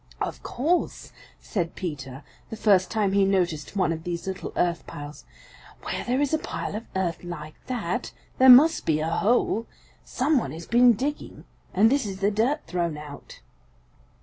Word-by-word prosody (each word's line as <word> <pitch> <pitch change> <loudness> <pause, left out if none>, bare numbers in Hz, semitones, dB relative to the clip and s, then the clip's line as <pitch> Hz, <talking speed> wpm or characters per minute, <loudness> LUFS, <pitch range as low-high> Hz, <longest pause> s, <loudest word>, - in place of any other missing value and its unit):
"Of - - -4
course," 325 +8 -1 0.3
said 175 -6 -3
Peter 140 -6 -6 0.3
the - - -5
first 195 -4 +3
time 210 -3 0
he 200 0 +3
noticed 180 -5 0
one 190 -4 +1
of 160 -1 -4
these 170 -1 -4
little 190 0 -5
earth 170 -1 0
piles, 145 +1 -9 0.6
"where - - -3
there 250 +2 0
is 290 +1 0
a 315 - +2
pile - - -5
of 225 +2 -6
earth 180 -3 -2
like 155 -3 -7
that, 240 -2 -3 0.3
there 260 0 +7
must 295 +6 +7
be 155 -1 +2
a 155 - -1
hole. 225 +4 +1 0.4
Some 275 +2 +1
one - - -5
has 165 +1 -8
been 240 0 +5
digging, 280 +7 -4 0.3
and 215 +5 +4
this 275 -5 +1
is 190 -1 -6
the 200 +1 +2
dirt 240 +9 0
thrown 170 -3 -2
out." 150 -1 -11
195 Hz, 175 wpm, -25 LUFS, 170-245 Hz, 0.6 s, there